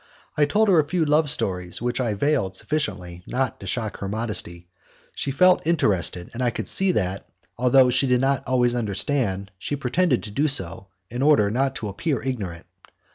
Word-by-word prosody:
I 150 Hz, -, +3 dB
told 215 Hz, +9 st, +2 dB
her 185 Hz, -5 st, +5 dB
a -, -, +4 dB
few 165 Hz, +1 st, 0 dB
love 150 Hz, 0 st, +2 dB
stories 90 Hz, -7 st, -1 dB
which 120 Hz, +1 st, -2 dB
I 115 Hz, -4 st, -1 dB
veiled 120 Hz, -6 st, 0 dB
sufficiently 95 Hz, -, -3 dB
not 130 Hz, -1 st, -2 dB
to 100 Hz, -, -9 dB
shock 110 Hz, +1 st, -3 dB
her 100 Hz, -, -5 dB
modesty. 100 Hz, -5 st, -5 dB, 0.5 s
She -, -, -4 dB
felt 180 Hz, +4 st, +3 dB
interested, 95 Hz, -, +1 dB
and 120 Hz, -, -5 dB
I 125 Hz, -, +2 dB
could 120 Hz, -, -5 dB
see 195 Hz, -1 st, +4 dB
that, 95 Hz, -, -2 dB, 0.3 s
although 125 Hz, +1 st, +4 dB
she 135 Hz, +2 st, +1 dB
did 125 Hz, -1 st, +3 dB
not 135 Hz, +1 st, +1 dB
always 125 Hz, -2 st, +2 dB
understand, 100 Hz, -3 st, -1 dB
she 145 Hz, -, -3 dB
pretended 140 Hz, +1 st, 0 dB
to 105 Hz, -, -7 dB
do 145 Hz, +9 st, +1 dB
so, 95 Hz, -, 0 dB, 0.2 s
in 120 Hz, +2 st, -4 dB
order 140 Hz, -9 st, +4 dB
not 135 Hz, +3 st, 0 dB
to 110 Hz, -, -5 dB
appear 135 Hz, -, -2 dB
ignorant. 100 Hz, -11 st, -5 dB
125 Hz, 185 wpm, -23 LUFS, 100-145 Hz, 0.5 s, her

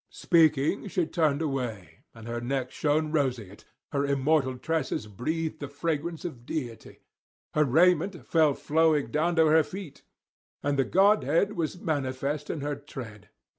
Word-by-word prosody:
Speaking 160 Hz, +2 st, +2 dB
she 180 Hz, -2 st, 0 dB
turned 155 Hz, -2 st, +1 dB
away, 125 Hz, -, -4 dB
and 115 Hz, 0 st, -11 dB
her 120 Hz, 0 st, -3 dB
neck 130 Hz, +1 st, -2 dB
shone 155 Hz, +1 st, 0 dB
roseate, 125 Hz, -, -2 dB, 0.3 s
her 140 Hz, -2 st, 0 dB
immortal 140 Hz, -1 st, +1 dB
tresses 155 Hz, -6 st, -2 dB
breathed 155 Hz, -, -3 dB
the 145 Hz, -, -5 dB
fragrance 160 Hz, +3 st, -3 dB
of 130 Hz, -9 st, -6 dB
deity; 120 Hz, -5 st, -6 dB, 0.5 s
her 150 Hz, -, +4 dB
raiment 175 Hz, +2 st, +2 dB
fell 155 Hz, -4 st, +3 dB
flowing 155 Hz, -1 st, +2 dB
down 170 Hz, +3 st, +1 dB
to 160 Hz, -1 st, +5 dB
her 160 Hz, +1 st, +5 dB
feet, 185 Hz, -2 st, -9 dB, 0.6 s
and 140 Hz, -1 st, 0 dB
the 135 Hz, -, +3 dB
godhead 195 Hz, -, +3 dB
was 170 Hz, 0 st, -3 dB
manifest 140 Hz, -1 st, -2 dB
in 155 Hz, -, -3 dB
her 145 Hz, 0 st, -2 dB
tread. 125 Hz, -7 st, -10 dB
150 Hz, 145 wpm, -27 LUFS, 130-160 Hz, 0.6 s, to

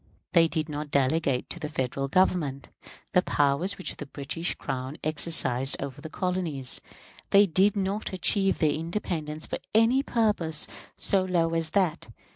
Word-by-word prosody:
They 165 Hz, -2 st, +6 dB
did 160 Hz, -1 st, -2 dB
not 150 Hz, -1 st, -5 dB
delegate 140 Hz, -1 st, +1 dB
to -, -, -5 dB
the 150 Hz, -, -4 dB
Federal 135 Hz, -2 st, -2 dB
Government 150 Hz, -5 st, +1 dB, 0.4 s
the 180 Hz, -, +5 dB
powers 145 Hz, +3 st, +1 dB
which 185 Hz, -, -4 dB
the 145 Hz, -, -7 dB
British 145 Hz, +5 st, -3 dB
Crown 130 Hz, +2 st, -5 dB
exercised 145 Hz, -4 st, +4 dB
over 140 Hz, +1 st, -6 dB
the 160 Hz, -, -8 dB
colonies; 170 Hz, -8 st, -1 dB, 0.5 s
they 200 Hz, +1 st, +6 dB
did 195 Hz, +3 st, +3 dB
not 200 Hz, +2 st, -2 dB
achieve 195 Hz, +1 st, +1 dB
their 155 Hz, -3 st, +2 dB
independence 160 Hz, -2 st, -3 dB
for -, -, -4 dB, 0.2 s
any 230 Hz, +4 st, +4 dB
purpose 210 Hz, -, 0 dB, 0.3 s
so 195 Hz, -1 st, +2 dB
low 170 Hz, -3 st, +1 dB
as 165 Hz, -1 st, 0 dB
that. 180 Hz, -4 st, 0 dB
160 Hz, 150 wpm, -27 LUFS, 145-185 Hz, 0.5 s, They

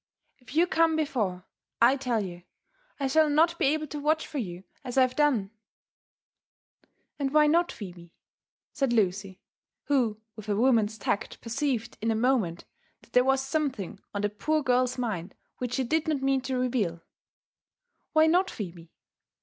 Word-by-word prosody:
If 255 Hz, +2 st, -13 dB
you 335 Hz, +2 st, +5 dB
oome 330 Hz, -2 st, +2 dB
before, 215 Hz, -, -1 dB, 0.3 s
I 240 Hz, +3 st, +6 dB
tell 250 Hz, -5 st, -1 dB
you 175 Hz, -3 st, -6 dB, 0.6 s
1 275 Hz, -2 st, -1 dB
shall 315 Hz, +2 st, +4 dB
not 330 Hz, +3 st, +3 dB
be -, -, +3 dB
able 310 Hz, +2 st, +1 dB
to 295 Hz, 0 st, -6 dB
watch 310 Hz, +2 st, +1 dB
for 295 Hz, -, -5 dB
you 180 Hz, -5 st, -5 dB, 0.2 s
as 250 Hz, -1 st, -5 dB
I 260 Hz, -, +7 dB
have 255 Hz, 0 st, 0 dB
done." 255 Hz, -10 st, +2 dB, 0.8 s
" -, -, -44 dB
And 275 Hz, -2 st, -1 dB
why 305 Hz, 0 st, +5 dB
not, 340 Hz, +3 st, +3 dB
Phebe?" 175 Hz, -4 st, -10 dB, 0.6 s
said 275 Hz, -5 st, 0 dB
Lucy, 195 Hz, -3 st, 0 dB, 0.4 s
who 245 Hz, -7 st, +1 dB, 0.2 s
with 215 Hz, -1 st, -9 dB
a 205 Hz, -, +2 dB
woman's 225 Hz, -2 st, +2 dB
tact 205 Hz, 0 st, -2 dB
per 230 Hz, -, -8 dB
ceived 240 Hz, -3 st, -1 dB
in 225 Hz, -, 0 dB
a 225 Hz, -, +2 dB
moment 220 Hz, -8 st, +1 dB, 0.4 s
that -, -, -23 dB
there 250 Hz, -, +6 dB
was 270 Hz, +1 st, +2 dB
something 270 Hz, -, -2 dB
on 205 Hz, 0 st, -3 dB
the 205 Hz, -, +2 dB
poor 305 Hz, +9 st, -1 dB
girl's 255 Hz, 0 st, +2 dB
mind 210 Hz, -7 st, -3 dB, 0.2 s
which 250 Hz, -1 st, -3 dB
she 265 Hz, -, 0 dB
did 315 Hz, +6 st, 0 dB
not 290 Hz, -4 st, 0 dB
mean 270 Hz, -1 st, +2 dB
to 260 Hz, 0 st, -2 dB
reveal 215 Hz, -10 st, -1 dB, 0.3 s
— -, -, -72 dB
" -, -, -51 dB
Why 315 Hz, 0 st, +6 dB
not, 360 Hz, +4 st, +3 dB
Phebe? 170 Hz, -5 st, -8 dB
255 Hz, 180 wpm, -28 LUFS, 210-295 Hz, 0.8 s, I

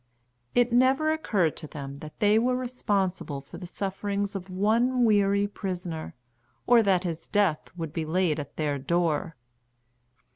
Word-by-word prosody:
It 245 Hz, 0 st, +3 dB
never 265 Hz, +5 st, +4 dB
occurred 205 Hz, -, +1 dB
to 155 Hz, -, -7 dB
them 140 Hz, -2 st, -7 dB
that 155 Hz, 0 st, -11 dB
they 210 Hz, 0 st, +4 dB
were 250 Hz, +2 st, +1 dB
responsible 200 Hz, -, -1 dB
for 135 Hz, -, -11 dB
the 180 Hz, -, -7 dB
sufferings 200 Hz, +2 st, -3 dB
of 190 Hz, -1 st, -6 dB
one 230 Hz, +6 st, +2 dB
weary 200 Hz, -2 st, +3 dB
prisoner, 180 Hz, -5 st, -5 dB, 0.5 s
or 240 Hz, -1 st, +6 dB
that 190 Hz, -4 st, +2 dB
his 165 Hz, -3 st, -4 dB
death 200 Hz, -7 st, +1 dB
would 165 Hz, -3 st, -5 dB
be 165 Hz, -, -2 dB
laid 165 Hz, -1 st, +1 dB
at 145 Hz, -, -7 dB
their 145 Hz, -3 st, -1 dB
door. 165 Hz, +2 st, 0 dB
195 Hz, 150 wpm, -27 LUFS, 160-220 Hz, 0.5 s, or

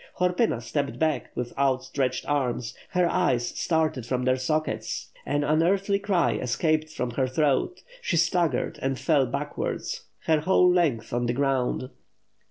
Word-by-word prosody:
Horpyna 180 Hz, -, +1 dB
stepped 140 Hz, 0 st, -2 dB
back 155 Hz, -2 st, 0 dB
with 125 Hz, -1 st, -4 dB
out 135 Hz, -2 st, +2 dB
stretched 135 Hz, -1 st, -2 dB
arms, 125 Hz, -5 st, -1 dB, 0.2 s
her 180 Hz, -1 st, +2 dB
eyes 130 Hz, -10 st, +1 dB
started 160 Hz, -6 st, 0 dB
from 125 Hz, +2 st, -2 dB
their 130 Hz, 0 st, +3 dB
sockets, 155 Hz, +4 st, -2 dB, 0.2 s
an 145 Hz, 0 st, +1 dB
un 155 Hz, +2 st, +2 dB
earthly 195 Hz, +3 st, +2 dB
cry 195 Hz, -4 st, +1 dB
escaped 155 Hz, +5 st, 0 dB
from 125 Hz, -5 st, -3 dB
her 130 Hz, +2 st, 0 dB
throat, 145 Hz, -, 0 dB, 0.2 s
she 170 Hz, -, 0 dB
staggered 170 Hz, 0 st, +1 dB
and 135 Hz, 0 st, -1 dB
fell 145 Hz, -4 st, +2 dB
backwards 140 Hz, +4 st, -4 dB, 0.2 s
her 160 Hz, -1 st, +3 dB
whole 180 Hz, +3 st, +4 dB
length 160 Hz, -12 st, +1 dB
on 120 Hz, 0 st, 0 dB
the 120 Hz, -, +1 dB
ground. 130 Hz, -1 st, 0 dB
145 Hz, 155 wpm, -26 LUFS, 130-170 Hz, 0.2 s, whole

